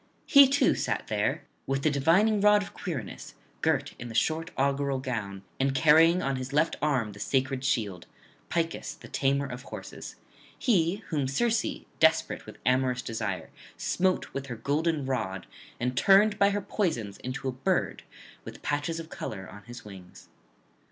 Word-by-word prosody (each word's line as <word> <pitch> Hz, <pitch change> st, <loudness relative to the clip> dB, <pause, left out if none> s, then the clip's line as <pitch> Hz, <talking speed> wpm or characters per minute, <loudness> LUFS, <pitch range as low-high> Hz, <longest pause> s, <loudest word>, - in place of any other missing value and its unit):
He 280 Hz, -2 st, +8 dB
too 280 Hz, +2 st, +3 dB
sat -, -, -2 dB
there, -, -, 0 dB, 0.2 s
with 135 Hz, 0 st, -1 dB
the 155 Hz, -, +3 dB
divining 180 Hz, +10 st, +3 dB
rod 210 Hz, 0 st, +5 dB
of -, -, -11 dB
Quirinus, 140 Hz, -, -6 dB, 0.3 s
girt -, -, +1 dB
in 120 Hz, -, -6 dB
the 115 Hz, -, -8 dB
short 160 Hz, +6 st, +1 dB
augural 140 Hz, 0 st, +1 dB
gown, 105 Hz, -7 st, -4 dB, 0.2 s
and 135 Hz, 0 st, +1 dB
carrying 165 Hz, +5 st, +5 dB
on 135 Hz, -1 st, -1 dB
his 130 Hz, +1 st, -5 dB
left 150 Hz, +3 st, +2 dB
arm 135 Hz, -8 st, +1 dB
the 100 Hz, -, -12 dB
sacred 130 Hz, +2 st, 0 dB
shield, 105 Hz, -10 st, -1 dB, 0.4 s
Picus 165 Hz, -3 st, -2 dB
the -, -, -11 dB
tamer 140 Hz, +1 st, +1 dB
of 125 Hz, -2 st, -7 dB
horses; -, -, -9 dB, 0.4 s
he 195 Hz, -3 st, +1 dB
whom 145 Hz, -5 st, 0 dB
Circe, 225 Hz, -, 0 dB
desperate 160 Hz, 0 st, +2 dB
with -, -, -10 dB
amorous 125 Hz, -1 st, +2 dB
desire, 105 Hz, -7 st, -4 dB, 0.3 s
smote 185 Hz, 0 st, 0 dB
with 135 Hz, 0 st, -4 dB
her 120 Hz, -, -5 dB
golden 145 Hz, +5 st, 0 dB
rod 95 Hz, -8 st, -2 dB, 0.3 s
and 125 Hz, +1 st, -1 dB
turned 200 Hz, +8 st, +5 dB
by 200 Hz, -, +5 dB
her 205 Hz, 0 st, -1 dB
poisons 160 Hz, -, -2 dB
into 130 Hz, +1 st, -5 dB
a -, -, 0 dB
bird 130 Hz, +1 st, -1 dB, 0.4 s
with -, -, -10 dB
patches 145 Hz, +3 st, -1 dB
of 165 Hz, -1 st, -9 dB
colour 95 Hz, -3 st, -6 dB
on 105 Hz, +1 st, -12 dB
his 120 Hz, -1 st, -10 dB
wings. 95 Hz, -3 st, -13 dB
140 Hz, 165 wpm, -28 LUFS, 125-165 Hz, 0.4 s, He